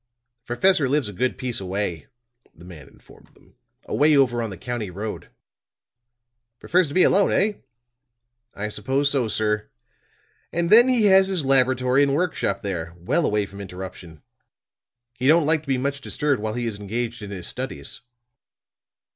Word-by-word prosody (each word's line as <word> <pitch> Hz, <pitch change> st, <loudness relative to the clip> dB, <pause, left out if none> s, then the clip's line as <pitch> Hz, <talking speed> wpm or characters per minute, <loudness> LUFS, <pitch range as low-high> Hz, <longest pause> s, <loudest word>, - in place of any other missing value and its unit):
"The 120 Hz, 0 st, -51 dB
professor 160 Hz, -2 st, +3 dB
lives 145 Hz, -3 st, +1 dB
a -, -, -9 dB
good 125 Hz, +7 st, -1 dB
piece 125 Hz, -2 st, -3 dB
away," 95 Hz, -5 st, -4 dB, 0.5 s
the 85 Hz, -, -15 dB
man 85 Hz, -6 st, -12 dB
informed -, -, -20 dB
them. -, -, -24 dB, 0.3 s
"Away 150 Hz, 0 st, +3 dB
over 120 Hz, -3 st, +2 dB
on 115 Hz, -, -3 dB
the 95 Hz, -, -8 dB
county 120 Hz, -1 st, -4 dB
road." 105 Hz, +4 st, -6 dB, 1.3 s
"Prefers 180 Hz, 0 st, +2 dB
to 145 Hz, -, -8 dB
be 185 Hz, -, +5 dB
alone, 200 Hz, +1 st, +3 dB
eh?" 210 Hz, +2 st, +2 dB, 1.0 s
"I 105 Hz, +1 st, -4 dB
suppose 135 Hz, +7 st, -1 dB
so, 130 Hz, -5 st, 0 dB
sir. 105 Hz, 0 st, -1 dB, 0.8 s
And 170 Hz, +1 st, -1 dB
then 235 Hz, +3 st, +8 dB
he 245 Hz, -4 st, +2 dB
has 190 Hz, -1 st, +6 dB
his 185 Hz, -7 st, -2 dB
laboratory 130 Hz, 0 st, +3 dB
and 140 Hz, -1 st, +2 dB
work 180 Hz, +2 st, 0 dB
shop 100 Hz, -, -2 dB
there, 85 Hz, -4 st, -4 dB
well 95 Hz, -, 0 dB
away 105 Hz, -1 st, 0 dB
from 100 Hz, 0 st, -11 dB
interruption. 90 Hz, -4 st, -9 dB, 0.9 s
He 130 Hz, +1 st, -2 dB
don't 160 Hz, +1 st, +5 dB
like 155 Hz, 0 st, +3 dB
to 155 Hz, -, -24 dB
be 135 Hz, -1 st, +1 dB
much 140 Hz, +2 st, -3 dB
disturbed 145 Hz, -5 st, -1 dB
while 110 Hz, +1 st, -3 dB
he 120 Hz, 0 st, -2 dB
is 110 Hz, -3 st, -4 dB
engaged 115 Hz, +3 st, -4 dB
in 105 Hz, -, -7 dB
his 95 Hz, -4 st, -6 dB
studies." 130 Hz, +1 st, -6 dB
120 Hz, 170 wpm, -23 LUFS, 105-145 Hz, 1.3 s, then